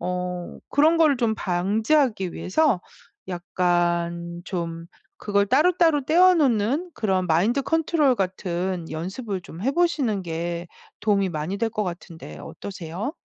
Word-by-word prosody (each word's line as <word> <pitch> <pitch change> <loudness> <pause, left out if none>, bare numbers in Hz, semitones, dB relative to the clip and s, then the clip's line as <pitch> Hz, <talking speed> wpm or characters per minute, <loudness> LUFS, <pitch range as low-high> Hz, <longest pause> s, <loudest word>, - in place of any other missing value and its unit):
...어 180 -1 -4
그런 315 +3 +4
거를 305 -4 +5
좀 230 -3 +1
방지하기 210 - +1
위해서 235 - +1 0.5
약간 175 -1 -1
좀 165 -3 -4 0.3
그걸 200 -1 +1
따로따로 315 - +3
떼어 360 +5 +6
놓는 275 - +1
그런 190 -4 0
마인드컨트롤같은 190 - +1
연습을 190 +5 -4
좀 175 +1 -10
해보시는 275 - +1
게 170 0 -4 0.3
도움이 200 -3 +2
많이 160 +5 -3
될 225 +1 -1
것 215 -1 -2
같은데 170 - -8
어떠세요? 190 - -6
195 Hz, 265 characters per minute, -24 LUFS, 175-270 Hz, 0.5 s, 떼어